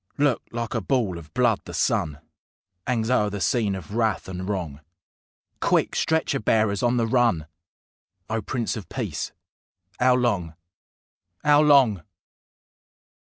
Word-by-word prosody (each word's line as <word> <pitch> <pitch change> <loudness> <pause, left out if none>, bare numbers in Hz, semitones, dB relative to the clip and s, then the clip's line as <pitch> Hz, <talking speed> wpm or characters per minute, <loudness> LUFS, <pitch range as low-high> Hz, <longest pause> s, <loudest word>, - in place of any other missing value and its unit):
Look! 140 -4 +2
like 115 -1 -4
a 115 - -1
ball 100 -6 0
of 75 -2 -14
blood 120 -4 +2
the - - -7
sun 75 -1 0 0.7
'Angs 115 -1 0
o'er 105 -5 +3
the 100 0 -5
scene 105 -1 +1
of 95 +2 -9
wrath 110 -2 0
and 95 +1 -5
wrong.... 85 -8 -3 0.8
"Quick! - - +1
Stretcher 160 -3 +1
bearers 110 -2 +1
on 120 0 +2
the 115 - +2
run!" 115 - +2 0.8
_O 110 0 -2
PRINCE 120 -3 -2
OF 105 - -9
PEACE! - - -4 0.7
'OW 125 0 +5
LONG, 100 -10 0 0.9
'OW 145 0 +6
LONG? 135 - +5
110 Hz, 135 wpm, -24 LUFS, 95-125 Hz, 0.9 s, OW